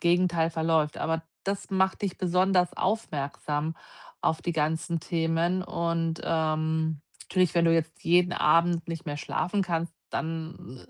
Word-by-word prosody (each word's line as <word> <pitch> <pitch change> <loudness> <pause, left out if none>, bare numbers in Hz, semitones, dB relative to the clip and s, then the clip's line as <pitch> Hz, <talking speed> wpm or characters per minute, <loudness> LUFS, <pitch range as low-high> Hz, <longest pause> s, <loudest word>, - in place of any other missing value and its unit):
Gegenteil 170 -1 +3
verläuft. 160 -2 +1
Aber 160 0 -1 0.2
das 195 +1 -3
macht 190 0 +1
dich 195 -3 -1
besonders 180 0 +2
aufmerksam, 155 -5 -2 0.5
auf 160 - +1
die 175 - -1
ganzen 160 +2 0
Themen 165 +3 0
und, 165 -2 -1
ähm 160 -1 0 0.3
natürlich, 185 -3 +2
wenn 170 - +5
du 165 0 +5
jetzt 160 -1 -2
jeden 175 +1 +4
Abend 170 +2 +3
nicht 165 -2 -5
mehr 145 -2 -3
schlafen 180 +6 -1
kannst, 170 -2 -1 0.2
dann 160 -5 -5
165 Hz, 140 wpm, -28 LUFS, 160-175 Hz, 0.5 s, wenn